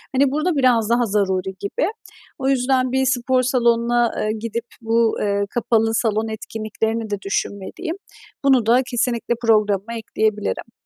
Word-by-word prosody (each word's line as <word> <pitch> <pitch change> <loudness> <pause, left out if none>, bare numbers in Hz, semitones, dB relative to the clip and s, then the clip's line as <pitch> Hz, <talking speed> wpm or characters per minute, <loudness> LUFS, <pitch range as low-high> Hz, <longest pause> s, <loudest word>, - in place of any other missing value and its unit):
hani, 270 0 +3
burada 310 +4 0
biraz 245 -5 +3
daha 240 +1 +3
zaruri 190 -2 0
gibi. 200 +10 -1 0.5
O 265 0 0
yüzden 255 -1 +2
bir 265 +1 +1
spor 255 0 +2
salonuna, 240 -1 +2
eee, 215 - 0
gidip 230 +1 -4 0.2
bu, 230 0 +2
eee, 200 -1 +1
kapalı 225 -1 +1
salon 220 -1 0
etkinliklerini 220 0 -3
de 205 -1 -3
düşünmeliyim. 200 - -3 0.5
Bunu 260 -5 +4
da 240 +3 +5
kesinlikle 240 -1 0
programıma 215 -1 +2
ekleyebilirim. 220 0 -2
230 Hz, 140 wpm, -21 LUFS, 215-250 Hz, 0.5 s, da